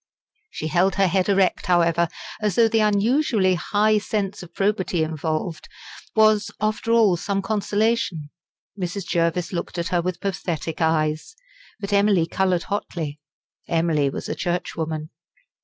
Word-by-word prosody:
She - - -6
held 180 +4 +2
her 195 - +3
head 185 +1 +1
erect, 195 -2 +2
however, 170 -1 +3 0.3
as 210 -4 0
though 230 -1 +5
the 225 0 +1
unusually 215 -1 +2
high 210 +5 +2
sense 200 -2 -3
of 175 -2 -11
probity 195 -4 0
involved, 160 +1 -3 0.5
was, 215 -1 +4
after 215 +2 -1
all, 220 -6 +4
some 195 +2 -2
consolation. 205 -6 0 0.4
Mrs. 190 0 -4
Jervis 170 +1 0
looked 175 0 -4
at 170 +1 -2
her 175 -1 +1
with 180 0 -3
pathetic 170 -4 -3
eyes. 155 - 0 0.4
But 200 0 -4
Emily 200 -4 +4
coloured 180 0 0
hotly. 165 -8 -4 0.5
Emily 165 -4 +1
was - - -6
a - - -2
churchwoman. 160 -3 -3
185 Hz, 140 wpm, -23 LUFS, 165-205 Hz, 0.5 s, though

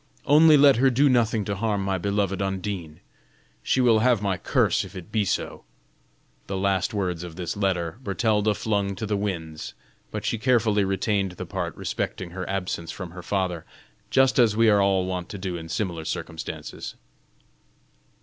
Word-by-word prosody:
Only 155 +1 +7
let 140 -3 +6
her 135 +2 +5
do 135 +3 +3
nothing 115 -4 +2
to 100 - -2
harm 105 -1 -1
my 95 -1 0
beloved 100 0 -1
Undine! 95 -5 -4 0.6
She 130 - +1
will 115 -3 +5
have 120 -1 +3
my 100 -2 0
curse 90 - +1
if - - -11
it 90 -2 -9
be 110 -2 +1
so." - - -2 0.8
The 95 - -3
last 95 -1 +1
words 90 -5 -2
of 85 -2 -8
this 85 -2 -4
letter, 95 -1 -1
Bertalda 105 0 +1
flung 100 -2 -1
to 100 - -4
the 105 -1 -1
winds, 85 -6 -4 0.3
but - - -5
she 115 - -1
carefully 110 -4 +3
retained 95 0 0
the - - -7
part - - -4
respecting 90 -2 -4
her 90 0 -5
absence 90 -3 -3
from 95 -4 -6
her 90 +1 -9
father 90 -3 -2 0.5
just 135 0 +3
as 110 -3 +4
we 115 -1 +5
are 100 -1 +4
all 95 -1 +2
wont 90 -1 -4
to 100 - -6
do 90 -2 -4
in 80 -1 -7
similar 85 -4 -2
circumstances. 80 0 -6
100 Hz, 175 wpm, -25 LUFS, 90-110 Hz, 0.8 s, Only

